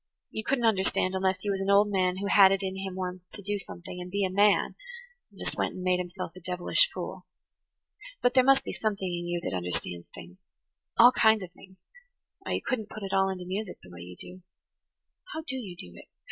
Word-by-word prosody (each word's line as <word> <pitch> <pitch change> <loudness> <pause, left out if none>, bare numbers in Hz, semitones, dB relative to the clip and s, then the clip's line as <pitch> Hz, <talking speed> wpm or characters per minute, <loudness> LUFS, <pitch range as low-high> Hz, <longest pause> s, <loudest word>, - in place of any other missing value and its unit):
You 220 - -4
couldn't 250 0 +1
understand 190 -3 +2
unless 190 0 0
you 205 - +1
was 195 -1 -1
an 195 - -1
old 205 +1 +5
man 185 -2 +1
who 200 - -3
had 200 -1 +7
it 195 0 0
in 190 0 -2
him 190 -1 -5
once 185 -1 -4
to 205 - -8
do 205 +1 -2
something 180 -1 -8
and 180 - -7
be 200 +1 0
a 185 - -2
man, 205 +1 +4 0.6
and - - -21
just - - -3
went - - -1
and 185 - -6
made 180 0 +2
himself 180 -1 -5
a - - -9
devilish 180 - +2
fool. - - -6 0.9
But 245 - +2
there 255 -1 +6
must 270 +1 +5
be - - -5
something 205 -3 -2
in 175 -1 -3
you 175 0 -1
that - - -2
understands 85 -1 -3
things–all 90 - 0
kinds 220 -4 +4
of 180 - -9
things–or 195 - -15
you - - -1
couldn't 220 -5 -2
put 215 - -8
it 195 - -4
all 195 0 +3
into 185 -1 -5
music 190 +1 -4
the 90 - -14
way 85 -1 -10
you 90 +1 -9
do. 185 +1 -9 0.9
How 320 - -3
do 275 -4 -4
you 200 -8 -7
do 90 - -9
it? - - -13
190 Hz, 220 wpm, -28 LUFS, 180-205 Hz, 0.9 s, had